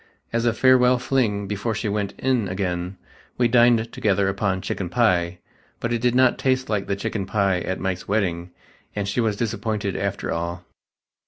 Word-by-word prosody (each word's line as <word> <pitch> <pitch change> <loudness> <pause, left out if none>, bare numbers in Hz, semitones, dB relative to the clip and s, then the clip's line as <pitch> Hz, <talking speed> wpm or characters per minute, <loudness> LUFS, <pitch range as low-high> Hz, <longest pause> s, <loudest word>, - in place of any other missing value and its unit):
As 115 0 +1
a 115 - +3
farewell 125 +1 +5
fling 120 -5 0
before 105 +3 -2
she 110 - -2
went 100 -1 -2
"in" 125 -6 +1
again, 90 0 -3 0.4
we 125 - +3
dined 120 -1 +4
together 100 -2 +1
upon 95 -1 -1
chicken 95 -1 -4
pie, 90 -6 +2 0.4
but 120 0 -2
it 115 - -1
did 125 0 +2
not 130 -1 +4
taste 130 0 0
like 105 -3 -1
the 100 - 0
"the - - -13
chicken 105 -3 -3
pie 100 -3 +1
at 95 +2 -3
Mike's 95 -1 -3
wedding" 90 -4 -1 0.5
and 100 -1 -2
she 100 +5 0
was 110 -3 0
disappointed 110 -3 -2
after 100 0 -2
all. 85 +1 -3
105 Hz, 180 wpm, -23 LUFS, 95-120 Hz, 0.5 s, farewell